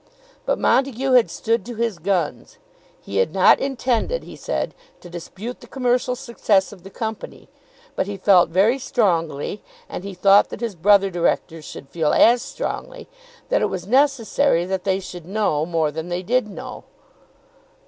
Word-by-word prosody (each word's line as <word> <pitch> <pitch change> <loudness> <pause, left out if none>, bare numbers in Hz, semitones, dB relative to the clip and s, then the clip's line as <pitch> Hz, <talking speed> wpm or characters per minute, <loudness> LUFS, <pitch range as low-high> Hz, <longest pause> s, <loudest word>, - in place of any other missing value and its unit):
But - - +1
Montague 265 0 +1
had 250 -3 +5
stood 230 0 -1
to 240 - -6
his 225 -5 -2
guns. 175 -2 -2 0.5
He 100 - -5
had 95 +10 +2
not 190 - +6
intended, 270 - -1
he - - -11
said, - - -3 0.3
to 175 - -13
dispute 190 +7 -7
the 240 - -14
commercial 250 0 0
success 215 -6 0
of 190 - -14
the 190 - -11
company. 220 +2 -6 0.5
But - - -1
he 205 -1 -5
felt 185 -3 +5
very 205 +10 +3
strongly, 170 - -1 0.3
and - - -7
he 200 -1 -7
thought 200 +2 +5
that - - -7
his 230 -2 -3
brother 195 +2 +4
directors 165 -2 -1
should 140 - -10
feel 160 -1 0
as 235 +1 +5
strongly, - - -6 0.4
that - - +2
it - - +1
was 180 -2 -5
necessary 260 - +2
that 190 0 -3
they 190 -1 +1
should 175 -3 -9
know 185 -7 0
more 165 -3 0
than 160 +3 -6
they 175 +1 -3
did 245 +4 +1
know. 255 +5 -9
200 Hz, 170 wpm, -21 LUFS, 175-240 Hz, 0.5 s, not